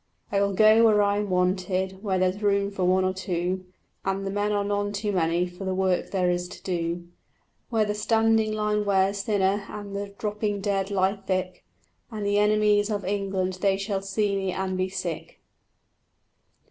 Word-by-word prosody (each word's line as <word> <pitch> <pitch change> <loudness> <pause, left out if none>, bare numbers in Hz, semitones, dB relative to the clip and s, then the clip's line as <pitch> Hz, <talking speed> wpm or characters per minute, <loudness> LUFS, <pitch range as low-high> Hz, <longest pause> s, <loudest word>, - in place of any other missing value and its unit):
"I 200 -1 +2
will 200 0 +1
go 215 +3 +6
where 210 -2 +5
I 200 0 +2
am 205 -1 -2
wanted, 185 +1 0
where 195 -3 0
there's 185 +2 0
room 200 -1 +1
for 195 -2 -3
one 185 +1 +3
or 185 - +1
two, 185 0 -3 0.4
And 195 0 -2
the 195 - -2
men 205 +1 0
are 205 -1 +1
none 205 0 -1
too 205 +1 -2
many 170 -1 +1
for 180 +2 -9
the 190 -1 -1
work 185 -1 0
there 185 -2 0
is 175 0 -2
to - - -12
do; 170 -1 -2 0.6
Where 225 -2 +2
the 210 - -1
standing 220 +1 +2
line 210 0 0
wears 195 0 +2
thinner 200 -1 +1
and 205 -1 -7
the 200 0 -3
dropping 210 -1 -2
dead 195 -1 -1
lie 195 0 +1
thick; 185 -2 -3 0.5
And 215 -3 -5
the 205 0 +2
enemies 210 0 +3
of 205 -2 -2
England 190 -2 -1
they 195 -1 +3
shall 195 0 -2
see 200 +1 0
me 190 -1 -1
and 185 0 -2
be 185 0 -1
sick." 185 -4 -5
195 Hz, 185 wpm, -26 LUFS, 185-205 Hz, 0.6 s, go